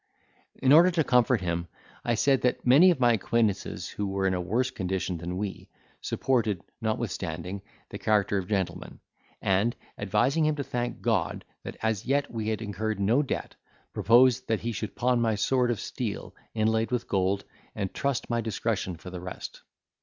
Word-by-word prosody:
In 135 -1 +2
order 170 +4 +8
to 170 -3 +1
comfort 125 -4 +3
him, 85 -1 -2 0.4
I 120 - +1
said, 135 +4 +3
that 125 - 0
many 140 +9 +7
of 170 -6 +2
my 120 -2 +5
acquaintances, 110 -2 0
who 105 - -3
were 95 0 -1
in 95 - +2
a 90 - -1
worse 120 +9 0
condition 95 -2 -2
than 90 +2 -4
we, 100 0 -5 0.3
supported, 115 -8 0 0.2
notwithstanding, 95 -5 -3 0.3
the 100 - -7
character 105 -2 +2
of 90 - -6
gentlemen; 95 -3 -3 0.4
and 100 +5 +2 0.2
advising 120 +10 +2
him 155 - +1
to 145 - -3
thank 120 -2 -3
God - - 0 0.2
that - - -8
as 110 -1 0
yet 140 +1 +1
we 110 -2 -3
had 110 0 -1
incurred 105 0 -3
no 110 +8 +3
debt, 140 - -3 0.4
proposed 125 +2 +4
he 115 +1 0
should 110 -1 -5
pawn 125 -1 +2
my 115 -2 +2
sword 125 +4 +2
of 120 -5 -1
steel, - - -4 0.2
inlaid 110 +1 +1
with 125 -2 -2
gold, 95 0 +1 0.3
and 95 -2 -3
trust 140 -3 -1
to - - -9
my 120 0 +1
discretion 110 -4 -2
for 90 - -10
the 90 -1 -6
rest. 90 0 -7
110 Hz, 175 wpm, -27 LUFS, 95-125 Hz, 0.4 s, order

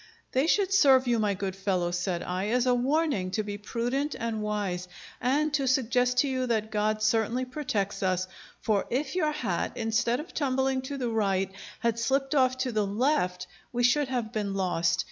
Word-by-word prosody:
"They 265 +4 +2
should 390 +2 +2
serve 265 -8 +6
you, 240 -2 +2
my 205 -2 +1
good 190 0 -3
fellow," 185 -3 0
said 175 0 -2
I, 185 +2 -2
"as 245 +3 +2
a 250 - +4
warning 260 - +1
to 215 - 0
be 205 0 -5
prudent 245 +7 -2
and 225 -1 -3
wise, 200 -4 -2 0.3
and 290 +5 +1
to 275 -2 +1
suggest 250 -1 +2
to 280 - +4
you 255 -1 -1
that 220 -2 -1
God 215 0 0
certainly 225 +3 +1
protects 225 -7 -2
us; 185 -1 0 0.3
for 210 -3 +1
if 265 +2 -1
your 315 -4 +1
hat, 300 - -2
instead 230 +2 0
of 320 +4 -8
tumbling 265 -2 0
to 280 - -4
the 250 -3 -2
right, 195 -4 0 0.3
had 235 -1 0
slipped 270 +4 0
off 255 -2 +3
to 250 - -2
the 215 -3 0
left, 200 -5 0 0.3
we 245 0 -1
should 275 +4 +3
have 245 -3 -3
been 205 -2 -2
lost. 175 -2 +1
235 Hz, 190 wpm, -28 LUFS, 200-265 Hz, 0.3 s, serve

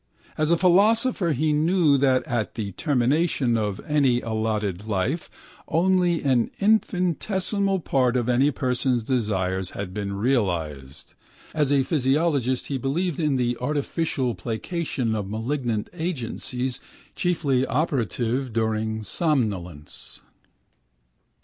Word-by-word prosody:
As 155 0 0
a 170 - +4
philosopher 200 +2 +3
he 150 +2 +1
knew 160 0 +3
that 130 -2 +3
at 120 -7 -2
the 105 -3 -3
termination 135 - +1
of 105 -3 -1
any 140 -5 +3
allotted 110 -3 -2
life 110 - -1 0.4
only 175 0 +2
an 130 -4 +2
infinitesimal 195 -1 +1
part 130 -4 +1
of 120 -1 -1
any 125 +3 +3
person's 125 -2 0
desires 95 -7 -1
has 100 -1 -4
been 100 +1 -4
realised. 90 - -2 0.4
As 150 -3 +1
a 140 -2 +4
physiologist 135 -2 +1
he 135 -2 -3
believed 160 +6 -1
in 150 -4 +1
the 120 -1 0
artificial 140 -2 -1
placation 120 - -3
of 105 -3 -3
malignant 115 0 -2
agencies 130 -6 -3 0.4
chiefly 145 -8 +1
operative 130 - -1
during 110 -1 -1
somnolence. 100 - -2
130 Hz, 110 wpm, -24 LUFS, 110-160 Hz, 0.4 s, a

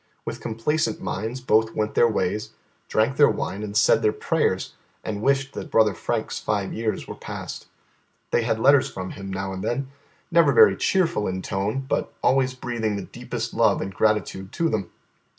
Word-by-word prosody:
With - - -5
complacent 115 +2 -1
minds 115 +6 -4
both 110 -2 +2
went 110 0 -1
their 120 - +5
ways, 105 -1 -1 0.3
drank 115 +5 +1
their 145 - +7
wine, 100 - -3
and 105 -1 -3
said - - +5
their 105 - +3
prayers, - - 0 0.3
and 105 -1 -4
wished 135 +2 +1
that - - -6
brother 110 -2 +4
Frank's 85 - -3
five 100 -2 -2
years 110 -1 -2
were - - -5
past. - - -7 0.6
They - - +3
had 115 -1 0
letters 140 +3 +5
from 95 -1 -6
him 95 -1 -7
now 95 0 -3
and 95 - -5
then, 135 +2 -2 0.4
never 170 0 +5
very 450 -1 +7
cheerful 170 - +1
in 95 0 -3
tone, 100 +6 -1
but - - -1
always 130 -1 +3
breathing 120 -4 -2
the 100 - -4
deepest - - -5
love - - +3
and 95 - -4
gratitude 105 -2 0
to 165 -1 +1
them. 100 - -2
110 Hz, 180 wpm, -24 LUFS, 100-130 Hz, 0.6 s, their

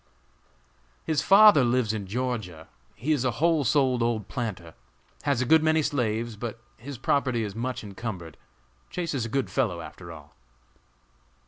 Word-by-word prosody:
"His 155 -2 0
father 200 -5 +7
lives 120 -2 +1
in 100 -3 -4
Georgia; 110 -8 -4 0.3
he 130 +9 -2
is 145 -5 +1
a 130 - +2
whole 165 -2 +2
souled 130 -1 +2
old 115 -4 -1
planter; 95 -10 -5 0.5
has 140 -3 +1
a - - -3
good 160 +5 +5
many 160 0 +2
slaves; 115 -5 -1
but 115 +2 -6 0.2
his 135 +3 -8
property 130 -2 0
is 105 -2 -5
much 120 +3 -4
encumbered. 95 -5 -7 0.5
Chase 170 -3 -3
is 125 -5 -1
a - - -5
good 135 +2 -1
fellow 110 -11 0
after 85 - -10
all!" - - -13
120 Hz, 155 wpm, -26 LUFS, 110-140 Hz, 0.5 s, father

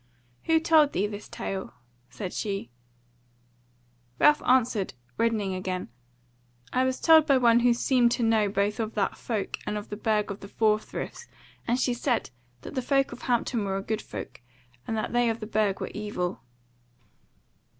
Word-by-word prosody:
"Who 325 0 +4
told 315 -3 +4
thee 195 - +1
this 205 0 -7
tale?" 190 -7 -5 0.3
said 185 -3 -6
she. 195 - -3 1.5
Ralph 295 0 +5
answered, 230 - +2 0.2
reddening 215 -4 0
again, 185 -4 -3 0.8
"I 255 +1 +3
was 260 0 -1
told 320 -2 +6
by 275 -2 +5
one 235 -2 +5
who 245 0 +4
seemed 245 -1 +3
to 240 - -1
know 220 -2 +3
both 200 +2 0
of 220 -1 -3
that 205 - 0
folk, 215 -5 -3
and 210 0 -1
of 205 - -7
the 210 - -4
Burg 210 -1 0
of 200 - -6
the 200 - -9
Four 215 +1 +2
Friths, - - -7 0.4
and 245 +2 +1
she 250 -1 +1
said 240 - -1 0.3
that - - -9
the 260 - -1
folk 275 +2 +1
of 245 - -9
Hampton 240 -2 0
were 195 -1 -1
a 195 - -4
good 220 +1 -2
folk, 125 -2 -8 0.5
and 225 - -2
that 215 - -3
they 240 -1 +3
of 225 0 -2
the 215 - -5
Burg 210 -2 0
were - - -4
evil." 200 -4 -3
220 Hz, 175 wpm, -27 LUFS, 205-245 Hz, 1.5 s, told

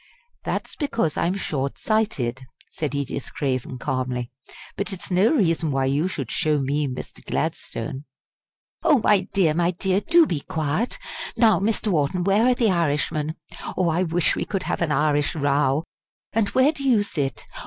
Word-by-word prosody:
"That's - - -3
because 230 - -1
I'm 175 +3 0
short 140 -7 -2
sighted," 135 - -1 0.2
said 145 -3 -3
Edith 140 -1 -3
Craven, 130 -2 -2
calmly; 130 -2 -2 0.4
"but 200 +2 -2
it's 190 0 -5
no 185 +5 +4
reason 165 - +2
why 135 -1 +1
you 140 +6 +1
should 140 -10 -4
show 155 -1 +1
me 140 +2 0
Mr. 130 -1 -7
Gladstone." 130 +5 -3 0.8
"Oh, 320 -4 +5
my 195 -3 +3
dear, 180 -6 +3
my 170 +2 +2
dear! 185 +2 0
do 335 +4 +5
be 165 - -1
quiet! 155 - -2 0.4
Now, 220 -6 +5
Mr. 215 +2 0
Wharton, 175 +1 +1
where 200 +5 +3
are 250 - +4
the 230 -4 +2
Irishmen? 155 -2 0 0.4
Oh! 180 -2 +2
I 165 +3 +1
wish 170 -1 +2
we - - -1
could 195 -2 -3
have - - -2
an 165 -3 +1
Irish 145 0 +2
row! 140 0 +2 0.5
And 215 -2 +2
where 260 +3 +4
do 285 -3 -7
you 240 -6 +4
sit? 135 - -3
160 Hz, 165 wpm, -24 LUFS, 140-200 Hz, 0.8 s, Oh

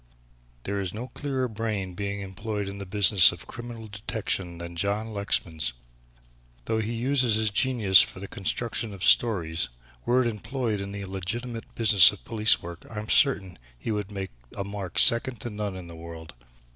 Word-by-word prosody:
There 100 0 -2
is 95 0 -4
no 125 +4 -6
clearer 135 -3 -2
brain 105 -4 -3
being 100 +2 -4
employed 105 +1 -4
in 100 0 -7
the 100 - -7
business 100 -1 +6
of 85 - -10
criminal 120 -2 -8
detection 100 -4 -3
than 85 0 -8
John 100 +5 -2
Lexman's. 80 -8 0 0.9
Though 110 0 0
he 110 +1 -2
uses 125 -1 +2
his 110 -1 +1
genius 105 -5 +5
for - - -2
the 100 - -7
construction 110 +2 -3
of 95 - -8
stories, 85 - +3 0.3
were 125 +1 +3
it - - 0
employed 115 0 -3
in 100 0 -6
the 100 0 -5
legitimate 115 +5 -5
business 105 -5 +7
of 105 - -13
police 110 -1 +3
work, 85 0 -8
I 110 - -9
am 105 +1 -5
certain 95 - +3 0.2
he 85 - -4
would 105 -2 -3
make 95 -2 -5 0.3
a 100 - -2
mark 100 -3 -6
second 120 0 +4
to 120 - -4
none 105 -2 -4
in 90 -1 -8
the 85 -1 -11
world. 80 -1 -10
105 Hz, 180 wpm, -26 LUFS, 95-115 Hz, 0.9 s, business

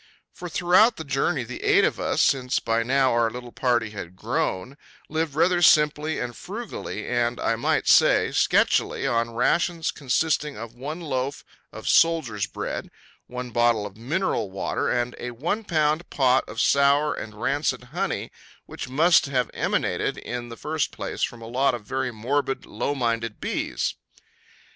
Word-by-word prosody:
For 180 - -8
throughout 185 +7 +4
the 160 - -5
journey 140 0 0
the 120 +1 -8
eight - - +4
of - - -1
us - - +1
since 130 -1 +1
by 115 +1 0
now 130 +2 +2
our 115 -1 +2
little 120 +1 -8
party 120 -4 0
had 95 -4 -8
grown 125 - -2 0.3
lived 160 -2 -2
rather 175 +2 +3
simply 150 -1 +4
and 120 -1 -4
frugally 220 +4 -6
and, 120 -1 0
I 115 - +1
might 115 - 0
say, - - +5
sketchily - - +2
on 115 0 0
rations 165 +7 +1
consisting 150 +2 0
of 115 +1 -8
one 145 +7 -6
loaf 135 -3 -3 0.3
of - - -9
soldiers' 155 -12 +3
bread, - - -5 0.4
one 125 0 -6
bottle 120 -2 +2
of 100 -1 -8
mineral 150 - -1
water 95 0 -2
and 120 0 -1
a 125 - -4
one 165 - -2
pound 155 -3 0
pot 130 -2 +2
of 115 - -6
sour 140 +4 +3
and 110 -1 -8
rancid 140 +1 0
honey 195 +3 -2 0.3
which - - -7
must 160 +5 +4
have 125 -4 -1
emanated - - -1
in 120 -1 -6
the 115 - -9
first 155 -1 -2
place - - -6
from 115 -1 -2
a - - -8
lot 130 +2 +1
of 110 -4 -9
very 130 +3 -2
morbid, 135 +5 -2
low 120 +7 -3
minded 115 -3 -2
bees. - - -2
130 Hz, 160 wpm, -24 LUFS, 120-155 Hz, 0.4 s, say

